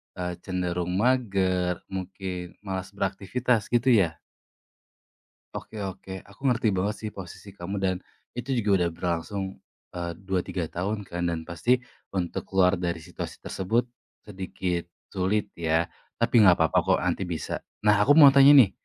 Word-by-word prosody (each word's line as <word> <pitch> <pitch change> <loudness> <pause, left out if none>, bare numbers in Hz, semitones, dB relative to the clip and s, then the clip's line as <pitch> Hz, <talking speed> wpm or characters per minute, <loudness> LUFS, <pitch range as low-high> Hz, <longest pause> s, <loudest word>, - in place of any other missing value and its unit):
eee, 90 -1 -3
cenderung 90 -1 -2
mager, 95 -7 +1
mungkin 95 -1 -5
malas 95 -1 -4
beraktivitas, 105 +5 0
gitu 120 +2 +3
ya? 95 -8 +4 1.4
Oke 110 - -7
oke, 95 0 -8
aku 100 +4 -18
ngerti 120 -2 +1
banget 100 +3 0
sih 110 -1 -5
posisi 95 +1 -9
kamu 95 +2 -4
dan 95 -1 0 0.4
itu 120 +2 -5
juga 105 -2 0
udah 85 - +2
berlangsung, 90 +3 -3 0.4
eee, 85 -1 -3
2, 95 -2 -1
3 85 -3 -3
tahun 100 +4 -3
kan 85 0 -2
dan 80 -1 -4
pasti 120 +9 +2 0.3
untuk 90 -3 -2
keluar 95 0 +4
dari 85 -2 -2
situasi 80 - -7
tersebut 115 +6 -1 0.4
sedikit 95 -3 -3 0.3
sulit 100 +3 +1
ya, 80 0 +1 0.3
tapi 115 -1 +4
enggak 90 -4 +7
apa-apa 80 0 +3
kok, - - +2
nanti - - 0
bisa. 85 -3 -4 0.2
Nah, 105 - +7
aku 145 +7 +5
mau 140 -2 +9
tanya 140 0 +8 0.2
nih - - -12
95 Hz, 150 wpm, -26 LUFS, 90-105 Hz, 1.4 s, mau